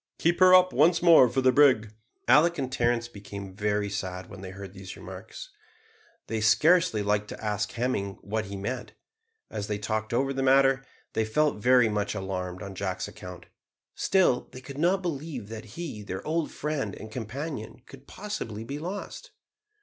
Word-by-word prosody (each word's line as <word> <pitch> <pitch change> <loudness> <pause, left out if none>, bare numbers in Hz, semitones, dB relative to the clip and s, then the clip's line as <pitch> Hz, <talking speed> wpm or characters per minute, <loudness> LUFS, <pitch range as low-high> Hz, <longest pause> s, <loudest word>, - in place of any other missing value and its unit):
Keep 170 +1 +1
her 185 0 +8
up 185 0 +5
once 165 +5 +4
more 165 -8 +8
for 130 +3 0
the 130 0 +5
brig." 125 -7 +4 0.3
Alick 155 +7 +5
and 130 -2 -3
Terence 120 -1 +1
became 100 -3 -9
very 105 0 0
sad 95 -2 -5
when 100 - -9
they 95 - -7
heard 95 0 -9
these 95 -1 -9
remarks. - - -9 0.7
They 110 -1 -3
scarcely 155 - +4
liked 105 +1 0
to - - -8
ask 105 -2 -2
Hemming 115 -5 -2
what 110 +2 -3
he 100 +1 -7
meant. 125 +6 -5 0.6
As 105 -1 -4
they 105 - -2
talked 110 +1 -3
over 135 +3 +1
the 135 - -2
matter, 135 0 +4 0.3
they 110 - +1
felt 150 +7 +1
very 125 0 +5
much 105 -1 -1
alarmed 90 -2 -4
on 100 - -7
Jack's 95 -1 -3
account. 90 -1 -10 0.5
Still 185 -10 +2
they 130 - -10
could 140 +2 -9
not 185 +4 +2
believe 145 - -4
that 115 0 -7
he, 160 -11 -5
their 95 -2 -6
old 160 0 0
friend 140 -10 -3
and 110 +1 -10
companion, 125 +1 -6
could 135 0 -15
possibly 180 - -5
be 140 +5 -5
lost. 200 - -6
120 Hz, 175 wpm, -27 LUFS, 105-145 Hz, 0.7 s, her